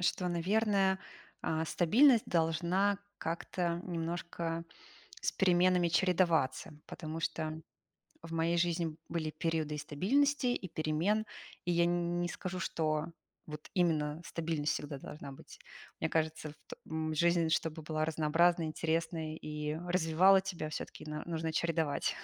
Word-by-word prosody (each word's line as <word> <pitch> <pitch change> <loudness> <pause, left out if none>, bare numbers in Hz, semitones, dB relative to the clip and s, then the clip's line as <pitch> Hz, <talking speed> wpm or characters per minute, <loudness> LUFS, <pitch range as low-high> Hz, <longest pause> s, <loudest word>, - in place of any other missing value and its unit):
что, 180 0 +1
наверное, 195 +2 +2 0.4
а, 160 0 0
стабильность 230 - +5
должна 175 +4 +2 0.2
как-то 170 +1 -2
немножко 170 -1 -3 0.6
с - - 0
переменами 180 -1 +4
чередоваться. 170 -7 +2
Потому 160 -1 -6
что 155 0 -2 0.6
в 165 0 -8
моей 165 +1 +1
жизни 170 -2 0
были 160 -2 -2
периоды 155 -1 -1
и - - -4
стабильности, 255 - +1
и 245 -6 -1
перемен. 165 +8 0 0.4
И 175 - +1
я 170 0 +4
не 175 0 0
скажу, 185 +1 -5
что 155 -2 -1 0.4
вот 150 0 -8
именно 160 -4 +1
стабильность 160 -3 -1
всегда 145 -1 -4
должна 140 -1 -8
быть. 135 - -13 0.4
Мне 160 - 0
кажется, 160 -1 -1
вт 150 - -12 0.2
м, 160 0 -2
жизнь, 170 0 +3
чтобы 160 0 0
была 155 0 -2
разнообразной, 160 +2 +3
интересной 160 0 -2
и 150 -1 -4
развивала 180 +2 +5
тебя, 180 -5 -4
всё-таки 155 - -6
на 150 0 -4
нужно 160 -1 -2
чередовать 160 -3 0
165 Hz, 130 wpm, -33 LUFS, 155-175 Hz, 0.6 s, стабильность